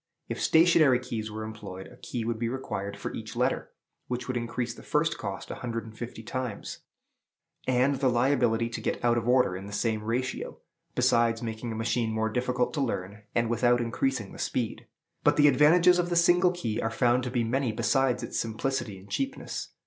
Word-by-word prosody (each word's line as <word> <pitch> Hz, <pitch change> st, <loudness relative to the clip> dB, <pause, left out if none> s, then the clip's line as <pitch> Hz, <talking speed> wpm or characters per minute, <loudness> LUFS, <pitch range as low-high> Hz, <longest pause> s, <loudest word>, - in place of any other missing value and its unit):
If -, -, -4 dB
stationary 160 Hz, -5 st, +5 dB
keys 115 Hz, -4 st, -4 dB
were 110 Hz, +1 st, -5 dB
employed, 105 Hz, -4 st, -7 dB
a 125 Hz, -, -13 dB
key 120 Hz, -2 st, -5 dB
would 115 Hz, -1 st, -2 dB
be 115 Hz, 0 st, 0 dB
required 100 Hz, -6 st, -4 dB
for -, -, -5 dB
each -, -, -7 dB
letter, -, -, 0 dB, 0.4 s
which 125 Hz, 0 st, -3 dB
would 130 Hz, -, -2 dB
increase 120 Hz, 0 st, -2 dB
the -, -, -12 dB
first 165 Hz, +2 st, 0 dB
cost 100 Hz, -3 st, -5 dB
a -, -, -7 dB
hundred 115 Hz, -2 st, -3 dB
and 110 Hz, -1 st, -11 dB
fifty 115 Hz, -1 st, -7 dB
times, 125 Hz, -2 st, -4 dB, 0.9 s
and 130 Hz, +2 st, +3 dB
the 130 Hz, -1 st, +2 dB
liability 120 Hz, -2 st, +2 dB
to 115 Hz, -, -5 dB
get -, -, -2 dB
out 120 Hz, 0 st, +4 dB
of 120 Hz, 0 st, -1 dB
order 125 Hz, -7 st, +4 dB
in 95 Hz, +2 st, -7 dB
the -, -, -8 dB
same 105 Hz, +1 st, 0 dB
ratio, 125 Hz, +3 st, -2 dB, 0.4 s
besides 115 Hz, 0 st, +3 dB
making 115 Hz, +1 st, -4 dB
a -, -, -4 dB
machine 115 Hz, 0 st, 0 dB
more 110 Hz, 0 st, 0 dB
difficult 125 Hz, +1 st, 0 dB
to 150 Hz, -, -1 dB
learn, 105 Hz, -5 st, -3 dB
and 115 Hz, 0 st, +2 dB
without 120 Hz, +1 st, +3 dB
increasing 120 Hz, -2 st, -1 dB
the -, -, -11 dB
speed. 120 Hz, -4 st, -2 dB, 0.4 s
But -, -, +4 dB
the 150 Hz, 0 st, +7 dB
advantages 170 Hz, +6 st, +6 dB
of 175 Hz, 0 st, 0 dB
the 175 Hz, -, 0 dB
single 175 Hz, +1 st, +5 dB
key 115 Hz, -12 st, -3 dB
are 115 Hz, -, 0 dB
found 120 Hz, +2 st, +2 dB
to -, -, -2 dB
be 120 Hz, -1 st, 0 dB
many 125 Hz, +1 st, 0 dB
besides 120 Hz, +3 st, +1 dB
its -, -, -3 dB
simplicity 115 Hz, -1 st, -2 dB
and 95 Hz, +1 st, -14 dB
cheapness. 275 Hz, -, -3 dB
120 Hz, 200 wpm, -28 LUFS, 110-130 Hz, 0.9 s, the